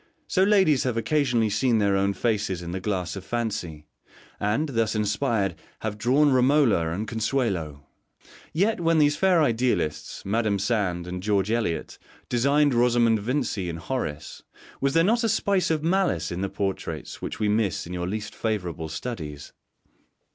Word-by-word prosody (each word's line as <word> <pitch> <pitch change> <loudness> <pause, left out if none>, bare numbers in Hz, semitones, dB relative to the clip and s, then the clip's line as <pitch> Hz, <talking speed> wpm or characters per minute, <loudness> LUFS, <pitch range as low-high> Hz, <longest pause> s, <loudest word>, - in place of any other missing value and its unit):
So 185 - +1
ladies 190 -9 +4
have 125 -3 -1
occasionally 120 -3 +1
seen 115 +3 +2
their 100 -2 +2
own 100 +1 +1
faces 105 -5 -1
in 85 - -5
the 95 - -3
glass 90 -3 -2
of 95 - -7
fancy, 95 -9 -3 0.5
and, 110 +10 0
thus 115 -3 0
inspired, 105 -1 0 0.3
have 105 -1 -4
drawn 135 +6 +3
Romola 130 - +3
and 100 +7 -3
Consuelo. 105 - -2 0.7
Yet 200 +6 +1
when 165 -1 +2
these 145 -1 +4
fair 180 -3 +3
idealists, 115 - -1
Mdme. 105 0 0
Sand 95 -5 -1
and 90 +1 -5
George 100 0 +1
Eliot, 115 -8 -2 0.3
designed 140 +4 +3
Rosamund 120 -2 +3
Vincy 110 -5 -2
and 85 - -5
Horace, 80 - -4 0.4
was 140 +2 +1
there 165 - +5
not 230 +6 +2
a 225 - +2
spice 195 -2 +1
of 155 -2 0
malice 165 - +1
in 90 +1 -3
the 100 - -1
portraits 95 -1 -4
which - - -5
we 105 - +1
miss 105 -3 0
in 85 - -7
your 90 0 -3
least 110 +2 -4
favourable 90 -7 -3
studies? 75 - -6
110 Hz, 160 wpm, -25 LUFS, 95-135 Hz, 0.7 s, there